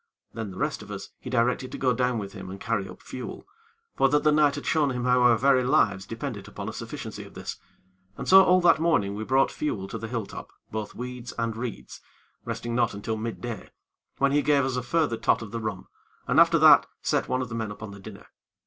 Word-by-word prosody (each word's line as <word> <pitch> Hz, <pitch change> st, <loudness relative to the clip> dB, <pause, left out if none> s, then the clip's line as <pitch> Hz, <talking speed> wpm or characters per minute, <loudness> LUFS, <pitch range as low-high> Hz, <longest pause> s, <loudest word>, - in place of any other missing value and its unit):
Then, 110 Hz, -2 st, -5 dB
the 95 Hz, -, -10 dB
rest -, -, -2 dB
of -, -, -12 dB
us -, -, -7 dB
he -, -, -8 dB
directed 125 Hz, +1 st, +1 dB
to -, -, -5 dB
go 130 Hz, -2 st, +2 dB
down 125 Hz, +1 st, 0 dB
with 100 Hz, -2 st, -5 dB
him 95 Hz, -2 st, -8 dB
and 95 Hz, +1 st, -8 dB
carry 105 Hz, -5 st, -2 dB
up 90 Hz, -, -13 dB
fuel; 130 Hz, -, -8 dB, 0.5 s
for 135 Hz, -, +3 dB
that 150 Hz, +1 st, +2 dB
the 155 Hz, -, +5 dB
night 150 Hz, -1 st, +4 dB
had 145 Hz, -, -6 dB
shown 155 Hz, -3 st, +2 dB
him 125 Hz, -2 st, -3 dB
how 125 Hz, 0 st, +3 dB
our 120 Hz, -2 st, +5 dB
very 130 Hz, +1 st, +4 dB
lives 105 Hz, -8 st, +2 dB
depended 115 Hz, -3 st, -5 dB
upon -, -, -7 dB
a -, -, -4 dB
sufficiency -, -, -7 dB
of -, -, -15 dB
this; -, -, -6 dB, 0.6 s
and -, -, -6 dB
so 190 Hz, 0 st, +9 dB
all 185 Hz, 0 st, +5 dB
that 175 Hz, -, +5 dB
morning 130 Hz, -12 st, +2 dB
we 105 Hz, +2 st, -4 dB
brought 130 Hz, +4 st, +2 dB
fuel 100 Hz, -11 st, -3 dB
to 115 Hz, -, -5 dB
the 115 Hz, -, -5 dB
hill 115 Hz, -2 st, -3 dB
top, -, -, -9 dB, 0.2 s
both 110 Hz, -1 st, -5 dB
weed 125 Hz, 0 st, -6 dB
and 115 Hz, -1 st, -1 dB
reeds, 115 Hz, -1 st, -6 dB, 0.4 s
resting 120 Hz, 0 st, -4 dB
not 120 Hz, -3 st, +1 dB
until 110 Hz, +2 st, -3 dB
midday, 115 Hz, 0 st, -5 dB, 0.5 s
when 140 Hz, 0 st, +2 dB
he 145 Hz, +1 st, +3 dB
gave 140 Hz, -1 st, +3 dB
us 130 Hz, -1 st, -1 dB
a 125 Hz, -, -1 dB
further 135 Hz, -1 st, 0 dB
tot -, -, +1 dB
of 105 Hz, -, -9 dB
the 115 Hz, -, -3 dB
rum, 105 Hz, -4 st, -5 dB, 0.4 s
and -, -, +3 dB
after -, -, +6 dB
that -, -, +7 dB, 0.2 s
set -, -, +1 dB
one 130 Hz, 0 st, 0 dB
of 125 Hz, -, -7 dB
the -, -, -7 dB
men 110 Hz, -2 st, -3 dB
upon 105 Hz, 0 st, -8 dB
the 100 Hz, -, -11 dB
dinner. 100 Hz, 0 st, -11 dB
120 Hz, 240 wpm, -26 LUFS, 110-135 Hz, 0.6 s, so